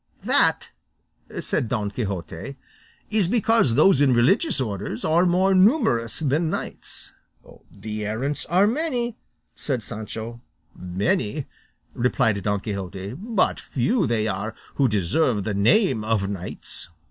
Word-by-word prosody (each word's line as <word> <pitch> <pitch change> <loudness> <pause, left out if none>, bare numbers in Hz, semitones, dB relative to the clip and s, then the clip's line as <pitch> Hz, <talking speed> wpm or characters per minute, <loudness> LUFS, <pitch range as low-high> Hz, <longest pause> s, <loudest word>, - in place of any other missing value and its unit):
"That," - - +2 0.7
said 115 - -1
Don 105 -4 -1
Quixote, 100 +2 -5 0.6
"is 210 -5 +2
because 225 - +2
those 150 0 +5
in 135 -4 +4
religious 185 - +3
orders 105 -1 -3
are 170 +3 +3
more 185 +2 +3
numerous 185 - +3
than 155 +2 0
knights." - - -7 0.6
"The 110 -1 -6
errants 130 +7 -2
are 185 +4 +4
many," 245 -2 -1 0.4
said 130 -6 -3
Sancho. 115 +2 -6 0.3
"Many," 105 - -1 0.5
replied 120 -4 +1
Don 100 0 -1
Quixote, 100 -1 -5
"but 210 - 0
few 185 - 0
they 110 -2 0 0.5
who 140 - +2
deserve 105 - +1
the 105 - -2
name 115 - +3
of 110 -3 0
knights." 95 -3 -5
120 Hz, 120 wpm, -24 LUFS, -, 0.7 s, those